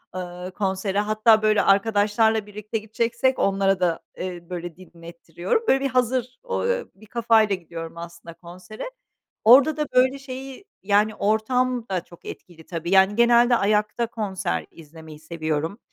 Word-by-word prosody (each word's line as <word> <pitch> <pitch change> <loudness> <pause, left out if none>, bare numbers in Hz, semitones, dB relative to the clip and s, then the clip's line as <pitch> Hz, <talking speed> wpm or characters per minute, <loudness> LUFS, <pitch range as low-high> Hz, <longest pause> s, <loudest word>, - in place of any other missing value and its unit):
ııı, 180 0 -6
konsere. 195 0 -2
Hatta 215 +1 +3
böyle 215 -1 +3
arkadaşlarla 210 +2 +2
birlikte 210 +1 -5
gideceksek 230 +4 -1
onlara 195 -1 +1
da, 170 -2 0 0.2
eee, 175 -2 -7
böyle, 175 -2 -6
dinlettiriyorum. 170 - -5
Böyle, 270 - +4
bir 275 - +1
hazır 255 0 -1
o 480 -1 -2
eee, 485 -1 -1
bir 215 - -17
kafayla 220 -3 +2
gidiyorum 165 -2 -9
aslında 170 0 -10
konsere. 185 - -10 0.5
Orada 275 +7 +6
da, 300 - 0
böyle, 260 +2 +3
şeyi, 270 +5 -9 0.2
yani, 210 +2 +2
ortam 245 +3 0
da 185 -3 -1
çok 175 -2 -18
etkili 165 -3 -11
tabii. 170 0 -5
Yani, 195 +1 +5
genelde 240 +1 +5
ayakta 215 +2 0
konser 190 - -3
izlemeyi 160 -1 -13
seviyorum. 160 +4 -3
205 Hz, 145 wpm, -23 LUFS, 175-235 Hz, 0.5 s, Orada